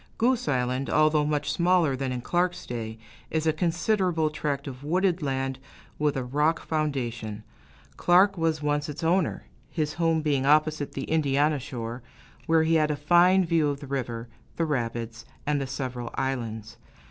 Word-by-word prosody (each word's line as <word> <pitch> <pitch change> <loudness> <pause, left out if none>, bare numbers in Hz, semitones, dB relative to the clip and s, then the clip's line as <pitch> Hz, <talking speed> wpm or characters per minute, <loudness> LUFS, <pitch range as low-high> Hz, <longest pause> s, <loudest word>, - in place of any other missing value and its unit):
Goose 250 +1 +1
Island, 130 0 0
although 155 0 +3
much 150 -1 0
smaller 170 -5 +3
than 130 0 -3
in 125 -1 -3
Clark's 175 +6 0
day, 110 -2 -5 0.3
is 160 0 -1
a 160 - +3
considerable 170 -1 +1
tract 145 -2 -2
of 130 0 -8
wooded 180 +3 +1
land, 135 -2 -2 0.4
with 150 -2 +1
a 130 - -1
rock 150 +6 +1
foundation. 120 -9 -2 0.5
Clark 190 +3 +5
was 160 -3 0
once 145 0 0
its 150 +3 -6
owner, 175 +3 +1 0.3
his 155 -2 -2
home 165 -2 +1
being 140 -3 +1
opposite 150 0 +3
on - - -22
the 135 - -4
Indiana 150 -1 +1
shore, 120 -2 -6 0.5
where 165 -1 +4
he 160 +1 +2
had 155 - +1
a 150 - 0
fine 175 +5 +4
view 165 -3 +2
of 140 -1 -3
the 145 - -8
river, 120 -4 -4 0.3
the 165 - 0
rapids, 120 -4 -3 0.2
and 145 -1 +1
the 135 - -3
several 125 -3 -4
islands. 115 -4 -3
150 Hz, 170 wpm, -26 LUFS, 130-165 Hz, 0.5 s, Clark